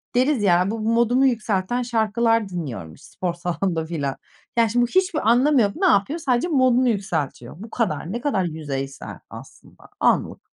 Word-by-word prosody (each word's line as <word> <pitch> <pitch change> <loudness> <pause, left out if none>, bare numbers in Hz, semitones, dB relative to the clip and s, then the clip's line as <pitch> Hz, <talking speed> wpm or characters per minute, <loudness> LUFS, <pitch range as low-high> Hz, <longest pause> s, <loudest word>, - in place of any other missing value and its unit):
deriz 255 -3 +2
ya, 180 +1 +3
bu 225 - -4
modumu 235 +4 +2
yükselten 225 -2 0
şarkılar 225 -2 +1
dinliyorum 120 - -6
spor 180 -2 -5
salonunda 175 -1 -2
filan. 145 -5 -3 0.4
Yani, 230 -1 +4
şimdi 240 +3 +2
bu - - +1
hiçbir 365 - +1
anlamı 255 +3 +4
yok. 200 -1 0
Ne 380 - 0
yapıyor? 295 - +2
Sadece 255 -1 0
modunu 255 -5 +3
yükseltiyor. 165 - -3
Bu 225 - -9
kadar. 180 -7 -2
Ne 235 +2 -4
kadar 220 -10 0
yüzeysel 140 -5 -5
aslında. - - -14 0.2
Anlık. - - 0
220 Hz, 160 wpm, -22 LUFS, 175-245 Hz, 0.4 s, Yani